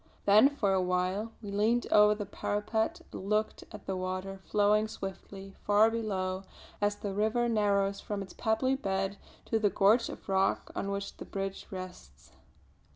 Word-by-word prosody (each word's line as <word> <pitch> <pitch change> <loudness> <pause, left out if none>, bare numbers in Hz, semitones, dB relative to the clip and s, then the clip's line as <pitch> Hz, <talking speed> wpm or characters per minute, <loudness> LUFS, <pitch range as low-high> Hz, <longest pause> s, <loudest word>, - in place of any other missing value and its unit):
Then 210 +7 +7
for 210 -9 0
a 190 - +2
while 185 +4 0
we 205 - -6
leaned 220 +4 +2
over 210 0 +6
the 205 -1 -4
parapet 220 - -2
and 195 - -7
looked 215 +1 0
at 210 -2 -10
the 190 - -2
water 185 +1 -4
flowing 210 +1 +3
swiftly 195 -1 -8
far 210 +2 +5
below 190 -5 -2 0.4
as 205 0 +2
the 205 -1 -5
river 220 +4 +1
narrows 200 -3 +1
from 205 -1 -4
its 190 - -12
pebbly 225 +4 +1
bed 195 -5 -1 0.3
to 225 - 0
the 210 -1 +3
gorge 210 +5 +3
of - - -9
rock 195 0 +1
on 200 - -2
which 200 0 -4
the - - -8
bridge 195 0 -5
rests. 180 - -9
205 Hz, 165 wpm, -30 LUFS, 195-215 Hz, 0.4 s, Then